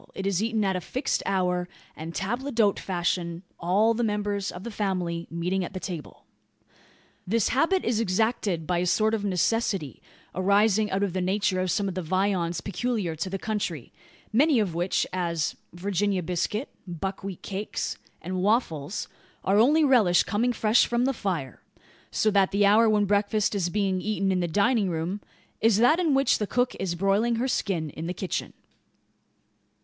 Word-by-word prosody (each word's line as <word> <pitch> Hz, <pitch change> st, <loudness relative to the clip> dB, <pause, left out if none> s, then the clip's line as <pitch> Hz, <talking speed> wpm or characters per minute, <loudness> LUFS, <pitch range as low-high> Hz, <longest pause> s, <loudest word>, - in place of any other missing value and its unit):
It 195 Hz, -, -4 dB
is 195 Hz, -1 st, +1 dB
eaten 220 Hz, -1 st, 0 dB
at 190 Hz, -1 st, +1 dB
a 180 Hz, -, -2 dB
fixed 260 Hz, -, -2 dB
hour, 180 Hz, -2 st, 0 dB, 0.3 s
and 160 Hz, +2 st, -7 dB
table 240 Hz, +8 st, -2 dB
d'hote 220 Hz, -5 st, +2 dB
fashion 175 Hz, -1 st, -2 dB, 0.2 s
all 200 Hz, +6 st, +3 dB
the 240 Hz, +1 st, -1 dB
members 205 Hz, -2 st, -1 dB
of 180 Hz, -, -9 dB
the 235 Hz, -, -5 dB
family 180 Hz, -5 st, -2 dB
meeting 180 Hz, +3 st, -1 dB
at 180 Hz, -, -6 dB
the 185 Hz, -, -4 dB
table. 175 Hz, -5 st, -7 dB, 1.0 s
This 225 Hz, +2 st, +2 dB
habit 335 Hz, +8 st, +2 dB
is 230 Hz, -2 st, +1 dB
exacted 200 Hz, -4 st, 0 dB
by 175 Hz, 0 st, 0 dB
a 180 Hz, -, 0 dB
sort 215 Hz, +5 st, +2 dB
of 215 Hz, -2 st, -1 dB
necessity, 195 Hz, -, 0 dB, 0.3 s
arising 205 Hz, +3 st, +3 dB
out 195 Hz, +1 st, 0 dB
of 195 Hz, -4 st, -1 dB
the 185 Hz, -, -1 dB
nature 190 Hz, 0 st, +1 dB
of 185 Hz, -, -1 dB
some 200 Hz, +3 st, 0 dB
of 190 Hz, -, -3 dB
the 185 Hz, -, -3 dB
viands 180 Hz, -1 st, 0 dB
peculiar 200 Hz, -3 st, -2 dB
to 170 Hz, +4 st, -3 dB
the 195 Hz, -, -3 dB
country; 195 Hz, -, -4 dB, 0.4 s
many 285 Hz, +4 st, +4 dB
of 200 Hz, -6 st, 0 dB
which, 175 Hz, +3 st, 0 dB
as 170 Hz, -3 st, -1 dB, 0.2 s
"Virginia 195 Hz, +1 st, -1 dB
biscuit," 180 Hz, -, -2 dB, 0.2 s
"buckwheat 190 Hz, +2 st, -5 dB
cakes," 200 Hz, +2 st, -4 dB, 0.2 s
and 185 Hz, +2 st, -3 dB
"waffles," 190 Hz, -, 0 dB, 0.4 s
are 200 Hz, +2 st, +4 dB
only 295 Hz, +8 st, +5 dB
relished 225 Hz, -11 st, +4 dB
coming 235 Hz, +4 st, +1 dB
fresh 220 Hz, 0 st, +3 dB
from, 240 Hz, +1 st, +1 dB
the 270 Hz, -, +1 dB
fire: 175 Hz, -, -3 dB, 0.5 s
so 215 Hz, -, +1 dB
that 195 Hz, -2 st, +3 dB
the 200 Hz, +1 st, +2 dB
hour 220 Hz, +3 st, +5 dB
when 210 Hz, -1 st, +3 dB
breakfast 205 Hz, +1 st, +1 dB
is 185 Hz, -4 st, 0 dB
being 190 Hz, -1 st, 0 dB
eaten 195 Hz, -2 st, 0 dB
in 185 Hz, -, +1 dB
the 175 Hz, -, 0 dB
dining 200 Hz, +3 st, +2 dB
room, 175 Hz, +5 st, -3 dB, 0.4 s
is 225 Hz, -2 st, +4 dB
that 245 Hz, +9 st, +4 dB
in 320 Hz, -6 st, +2 dB
which 275 Hz, 0 st, +3 dB
the 210 Hz, -, -1 dB
cook 245 Hz, +3 st, +1 dB
is 180 Hz, -3 st, -2 dB
broiling 200 Hz, +6 st, +2 dB
her 240 Hz, +3 st, 0 dB
skin 170 Hz, -, -1 dB
in 160 Hz, +3 st, -6 dB
the 180 Hz, -, -3 dB
kitchen. 190 Hz, -, -3 dB
195 Hz, 175 wpm, -26 LUFS, 180-220 Hz, 1.0 s, only